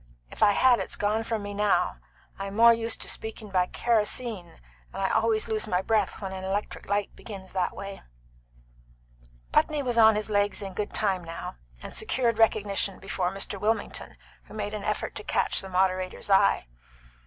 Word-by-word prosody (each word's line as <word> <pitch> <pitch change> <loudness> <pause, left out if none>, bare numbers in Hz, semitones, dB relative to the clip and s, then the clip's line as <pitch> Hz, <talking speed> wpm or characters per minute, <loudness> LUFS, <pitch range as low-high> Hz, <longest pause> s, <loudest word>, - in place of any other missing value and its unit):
If - - -10
I 205 - +6
had 250 +2 +5
it's - - -3
gone 210 +2 0
from 225 -2 -3
me 205 0 -5
now. 205 - +1 0.4
I'm 195 0 -5
more 235 +1 +8
used 230 0 -2
to - - -1
speaking 220 -2 -5
by 180 -1 +2
kerosene, 225 -4 -1 0.3
and - - -7
I 195 - +1
always 220 -1 +2
lose 215 0 -1
my 185 -2 0
breath 215 -3 +1
when 195 -2 -5
an 190 0 -6
electric 195 +2 -3
light 200 0 -1
begins 195 -4 -9
that 185 -2 -1
way." 200 0 -7 1.5
Putney 300 -2 +2
was 240 -2 0
on 220 -1 +7
his 215 +1 -2
legs 205 0 +1
in 195 -1 -6
good 205 +2 -3
time 190 -4 0
now, 165 - -7 0.3
and - - -8
secured 235 -3 0
recognition 200 -3 +2
before 190 -2 -2
Mr. 195 0 -2
Wilmington, 220 +2 -1 0.3
who - - -13
made 210 -1 -3
an 210 -2 -4
effort - - -2
to - - -5
catch - - +1
the 190 - -8
moderator's 185 +1 0
eye. 195 - +4
205 Hz, 180 wpm, -27 LUFS, 195-220 Hz, 1.5 s, more